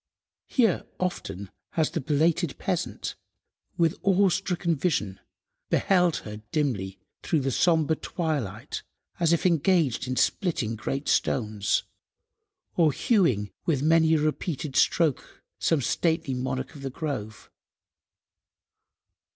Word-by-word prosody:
Here 230 Hz, -8 st, +2 dB
often 100 Hz, -, -3 dB, 0.2 s
has 160 Hz, -2 st, +1 dB
the -, -, -2 dB
belated 155 Hz, +3 st, +1 dB
peasant, 180 Hz, -2 st, -3 dB, 0.6 s
with 165 Hz, -1 st, +2 dB
awe–stricken 180 Hz, -3 st, +2 dB
vision, 130 Hz, -, -1 dB, 0.5 s
beheld 180 Hz, -4 st, +3 dB
her 105 Hz, -1 st, -6 dB
dimly 110 Hz, -, -1 dB, 0.2 s
through 155 Hz, -, +1 dB
the 135 Hz, 0 st, -1 dB
sombre 160 Hz, +2 st, +3 dB
twilight 155 Hz, -, -3 dB, 0.4 s
as 170 Hz, -1 st, +3 dB
if 170 Hz, -, +1 dB
engaged 165 Hz, -, +2 dB
in 130 Hz, -, -2 dB
splitting 135 Hz, -, 0 dB
great 135 Hz, +6 st, -3 dB
stones, 105 Hz, -4 st, +1 dB, 0.9 s
or 165 Hz, -4 st, +4 dB
hewing 130 Hz, -, +2 dB, 0.2 s
with 145 Hz, -5 st, +1 dB
many 160 Hz, 0 st, +4 dB
a -, -, +2 dB
repeated 155 Hz, -1 st, -2 dB
stroke 160 Hz, -6 st, +1 dB, 0.2 s
some 160 Hz, -4 st, +2 dB
stately 160 Hz, -1 st, 0 dB
"monarch 130 Hz, +1 st, -3 dB
of 145 Hz, -, -11 dB
the 135 Hz, -, -3 dB
grove." 125 Hz, -8 st, -5 dB
155 Hz, 110 wpm, -26 LUFS, 130-170 Hz, 0.9 s, or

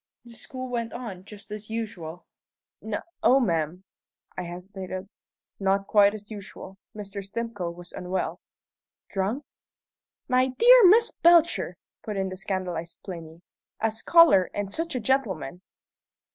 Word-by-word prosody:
"The 235 Hz, -, -11 dB
school 255 Hz, +2 st, -7 dB
went 235 Hz, -2 st, -3 dB
on 205 Hz, -7 st, -7 dB
just 205 Hz, -1 st, -12 dB
as 210 Hz, 0 st, -7 dB
usual?" 205 Hz, -7 st, -5 dB, 0.6 s
"No -, -, -3 dB, 0.2 s
o, 265 Hz, -, +5 dB
ma'am 170 Hz, -, -1 dB, 0.3 s
" -, -, -38 dB
I -, -, -3 dB
hesitated 185 Hz, +2 st, -7 dB, 0.5 s
"not 195 Hz, 0 st, +1 dB
quite 205 Hz, -1 st, +5 dB
just 210 Hz, -1 st, -8 dB
as 210 Hz, -, -16 dB
usual. 195 Hz, -2 st, -9 dB, 0.2 s
Mr. 200 Hz, -1 st, -6 dB
Stimcoe 205 Hz, -3 st, -4 dB
was 175 Hz, 0 st, -11 dB
unwell." 185 Hz, +1 st, -3 dB, 0.7 s
"Drunk?" 205 Hz, +9 st, -1 dB, 0.8 s
"My 255 Hz, 0 st, +3 dB
dear -, -, +8 dB
Miss 450 Hz, +5 st, +6 dB
Belcher!" 340 Hz, 0 st, +4 dB, 0.2 s
put 210 Hz, -3 st, -5 dB
in 190 Hz, 0 st, -1 dB
the 185 Hz, -, -6 dB
scandalized 185 Hz, -4 st, -4 dB
Plinny. 170 Hz, -2 st, -9 dB, 0.4 s
"A 225 Hz, 0 st, +1 dB
scholar, 220 Hz, -, +5 dB
and 205 Hz, -1 st, -3 dB
such 330 Hz, -2 st, -2 dB
a -, -, 0 dB
gentleman!" 210 Hz, -, -1 dB
200 Hz, 140 wpm, -26 LUFS, 185-235 Hz, 0.8 s, dear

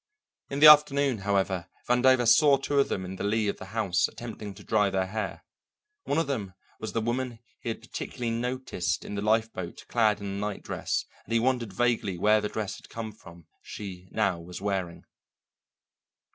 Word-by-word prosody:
In 140 Hz, +1 st, -3 dB
the -, -, +9 dB
afternoon, 145 Hz, -4 st, +7 dB
however, 95 Hz, -2 st, 0 dB, 0.2 s
Vandover 125 Hz, 0 st, +4 dB
saw 140 Hz, +4 st, +6 dB
two 140 Hz, +1 st, 0 dB
of 140 Hz, -, +3 dB
them 95 Hz, -, -2 dB
in 95 Hz, +1 st, -7 dB
the -, -, -4 dB
lee 105 Hz, +1 st, +1 dB
of 100 Hz, -, -1 dB
the -, -, -7 dB
house 100 Hz, -4 st, +1 dB
attempting 110 Hz, -4 st, -8 dB
to -, -, -13 dB
dry 105 Hz, -2 st, +2 dB
their 95 Hz, -1 st, 0 dB
hair; 105 Hz, +1 st, -4 dB, 0.6 s
one 145 Hz, -, 0 dB
of 165 Hz, -, +2 dB
them 105 Hz, -10 st, -3 dB, 0.2 s
was 110 Hz, -, -5 dB
the 115 Hz, -, 0 dB
woman 120 Hz, +1 st, -2 dB, 0.2 s
he -, -, -5 dB
had 115 Hz, -, -4 dB
particularly 120 Hz, 0 st, -4 dB
noticed 120 Hz, -8 st, -2 dB
in -, -, -6 dB
the 100 Hz, -, -2 dB
lifeboat 110 Hz, -4 st, -1 dB
clad 110 Hz, -3 st, +3 dB
in 100 Hz, -, -7 dB
a -, -, -3 dB
night 100 Hz, +1 st, -4 dB
dress, -, -, -2 dB, 0.2 s
and 115 Hz, -, -5 dB
he -, -, +5 dB
wondered 120 Hz, -3 st, 0 dB
vaguely 105 Hz, -3 st, 0 dB
where 105 Hz, +4 st, +4 dB
the 105 Hz, -, -2 dB
dress 105 Hz, -3 st, -4 dB
had -, -, -15 dB
come 115 Hz, -1 st, -5 dB
from 85 Hz, -5 st, -15 dB, 0.2 s
she 95 Hz, -3 st, -8 dB
now 100 Hz, -5 st, 0 dB
was 85 Hz, +1 st, -8 dB
wearing. 95 Hz, -4 st, -3 dB
110 Hz, 190 wpm, -28 LUFS, 95-120 Hz, 0.6 s, the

